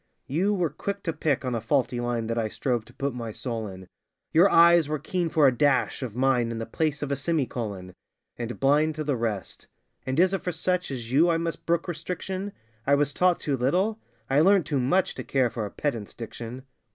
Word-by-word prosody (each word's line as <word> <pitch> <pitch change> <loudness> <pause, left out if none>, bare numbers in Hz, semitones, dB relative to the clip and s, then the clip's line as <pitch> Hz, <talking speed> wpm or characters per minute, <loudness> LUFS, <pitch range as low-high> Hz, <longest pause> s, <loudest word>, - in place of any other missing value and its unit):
You 175 +9 +1
were 175 -6 0
quick 200 +6 -4
to 165 - -1
pick 140 -4 0
on 125 - -1
a 115 - -1
faulty 120 0 0
line 120 -1 -1
That 115 +1 -2
I 110 - 0
strove 120 0 -2
to - - -17
put 140 -1 -2
my 115 -2 -5
soul 115 -1 -4
in: 95 -1 -10 0.4
Your 175 +5 +6
eyes 170 -3 +6
were 155 - 0
keen 170 +3 -2
for 155 -2 +4
a 130 -2 +5
'dash' 140 +2 +2
of 120 -5 -5
mine 125 -2 +2
In 115 - -4
the 115 - -3
place 150 +1 -1
of 145 - -3
a - - +2
semi 150 +1 0
colon 100 -7 -5 0.4
And 120 0 -5
blind 150 +3 +3
to 155 - -3
the 145 -2 0
rest. 110 -5 -4 0.4
And 130 +3 -1
is 185 +2 +4
it 195 - -1
for 180 - -2
such 180 +2 -1
As 120 -4 -5
you 160 +6 +5
I 165 - +3
must 165 0 -4
brook 170 +1 +1
restriction? 185 +4 -4 0.4
'I 140 - +5
was 145 0 +1
taught 180 -1 +3
too 145 - -1
little?' 185 - +1 0.3
I 135 +4 +3
learnt 190 0 +5
too 145 -2 0
much 170 +9 +2
To - - -6
care 130 -3 +1
for 110 -2 -3
a - - -8
pedant's 115 -7 -3
diction! 120 +2 -7
140 Hz, 225 wpm, -26 LUFS, 120-165 Hz, 0.4 s, Your